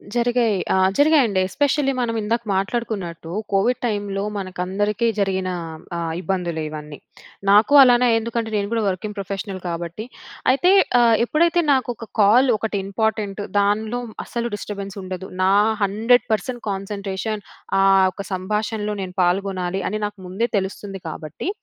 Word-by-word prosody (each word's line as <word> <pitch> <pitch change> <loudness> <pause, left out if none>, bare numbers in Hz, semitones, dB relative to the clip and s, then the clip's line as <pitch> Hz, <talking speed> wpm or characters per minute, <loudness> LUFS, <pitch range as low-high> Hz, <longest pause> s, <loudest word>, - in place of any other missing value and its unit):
జరిగాయి. 240 -3 +2 0.2
ఆ! - - +3 0.2
జరిగాయండి. 285 -10 +4
ఎస్పెషల్లీ 285 +2 +1
మనం 230 -2 -1
ఇందాక 230 +3 0
మాట్లాడుకున్నట్టు 195 -5 -3 0.2
కోవిడ్ 200 +6 +2
టైమ్‌లో 205 -3 -2
మనకందరికీ 195 +4 -1
జరిగిన 190 -2 0 0.5
ఆహ్, 165 -1 -2
ఇబ్బందులు 180 -4 -2
ఇవన్నీ. 150 -1 -8 0.5
నాకు 210 +7 +5
అలానే 250 -1 +5
ఎందుకంటే 230 0 -3
నేను 200 -1 0
కూడా 230 -1 0
వర్కింగ్ 200 +3 -3
ప్రొఫెషనల్ 195 -1 -5
కాబట్టి. 170 +5 -5 0.5
అయితే 355 +8 +3 0.3
ఆహ్, 230 -1 +5
ఎప్పుడైతే 335 +6 +2
నాకు 260 -2 0
ఒక 225 - -10
కాల్ 240 +6 +5
ఒకటి 215 -1 -2
ఇంపార్టెంట్ 210 0 -1 0.2
దానిలో 215 +4 0 0.2
అస్సలు 235 -1 -4
డిస్టర్బన్స్ 200 -1 -6
ఉండదు. 185 0 -6
నా 190 - +4 0.3
100% 230 +4 +1
కాన్సన్‌ట్రేషన్ 200 +1 -4 0.4
ఆ - - +4 0.3
ఒక 200 - -7
సంభాషణలో 210 +2 -2
నేను 180 -1 -6
పాల్గొనాలి 190 0 -1
అని 215 - -3
నాకు 205 0 -6
ముందే 195 +6 -1
తెలుస్తుంది 195 0 -4
కాబట్టి. 155 - -5
205 Hz, 130 wpm, -21 LUFS, 190-230 Hz, 0.5 s, నాకు